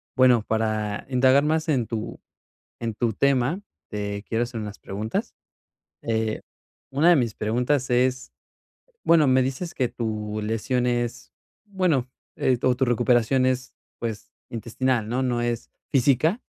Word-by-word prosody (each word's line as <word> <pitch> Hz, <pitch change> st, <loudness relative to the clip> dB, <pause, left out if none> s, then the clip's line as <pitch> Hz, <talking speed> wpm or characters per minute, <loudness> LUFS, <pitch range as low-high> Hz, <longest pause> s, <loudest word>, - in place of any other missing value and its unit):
bueno, 125 Hz, -4 st, +5 dB
para 110 Hz, -1 st, -1 dB
indagar 130 Hz, +2 st, +4 dB
más 155 Hz, +1 st, +1 dB
en 130 Hz, -7 st, +1 dB
tu 110 Hz, -2 st, -5 dB, 0.6 s
en 115 Hz, -1 st, -3 dB
tu 115 Hz, +1 st, 0 dB
tema, 140 Hz, -, +2 dB, 0.3 s
te 100 Hz, -1 st, -3 dB
quiero 115 Hz, +1 st, +1 dB
hacer 120 Hz, -2 st, -5 dB
unas 105 Hz, -1 st, -6 dB
preguntas, 105 Hz, +3 st, -4 dB, 0.7 s
eh, 110 Hz, -1 st, -1 dB, 0.5 s
una 150 Hz, +6 st, +3 dB
de 175 Hz, -, +7 dB
mis 115 Hz, -4 st, 0 dB
preguntas 125 Hz, +4 st, 0 dB
es, 130 Hz, +1 st, +1 dB, 0.7 s
bueno, 165 Hz, -3 st, +5 dB
me 130 Hz, 0 st, +4 dB
dices 135 Hz, +7 st, -3 dB
que 125 Hz, -3 st, 0 dB
tu 110 Hz, -2 st, -3 dB
lesión 115 Hz, +3 st, 0 dB
es, 120 Hz, +1 st, -2 dB, 0.3 s
bueno, 180 Hz, -11 st, 0 dB, 0.3 s
eh, 130 Hz, -2 st, +2 dB
o 125 Hz, -1 st, +3 dB
tu 130 Hz, -, 0 dB
recuperación 120 Hz, +1 st, +3 dB
es, 130 Hz, 0 st, -1 dB, 0.3 s
pues, 110 Hz, -3 st, -5 dB, 0.2 s
intestinal, 115 Hz, 0 st, -1 dB
¿no? 125 Hz, +3 st, -1 dB
No 120 Hz, -2 st, 0 dB
es 120 Hz, -1 st, -2 dB, 0.2 s
física. 145 Hz, -, +3 dB
125 Hz, 140 wpm, -25 LUFS, 110-130 Hz, 0.7 s, de